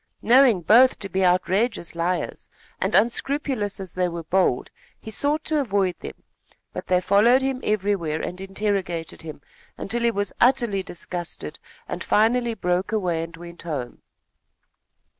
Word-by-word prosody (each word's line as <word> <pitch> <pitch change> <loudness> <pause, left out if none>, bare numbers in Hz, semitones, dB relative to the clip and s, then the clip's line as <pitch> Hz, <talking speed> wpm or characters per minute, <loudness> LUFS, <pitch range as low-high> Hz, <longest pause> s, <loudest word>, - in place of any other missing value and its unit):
Knowing 245 -5 +5
both 245 +9 +5
to 200 - -5
be 190 +1 0
outrageous 185 +2 +1
liars, 170 +2 -3 0.3
and - - 0
unscrupulous 235 -1 0
as 190 -2 -5
they 180 -1 0
were 170 -1 -5
bold, 175 -7 +1 0.3
he 220 - -9
sought 290 +7 +1
to 310 -1 0
avoid 200 -8 0
them; - - -10 0.5
but - - -6
they 180 -1 +3
followed 210 +8 +4
him 265 -1 -2
everywhere 195 -7 0
and 180 +1 -5
interrogated 195 -4 -3
him, 155 -3 -9 0.4
until 235 +4 -2
he 235 - +3
was 205 -2 -2
utterly 240 -6 +3
disgusted 175 -1 -6 0.3
and - - -5
finally 230 +2 +2
broke 180 +1 -1
away 180 -7 0
and 165 0 -7
went 170 0 -11
home. 145 -8 -5
195 Hz, 145 wpm, -23 LUFS, 175-235 Hz, 0.5 s, Knowing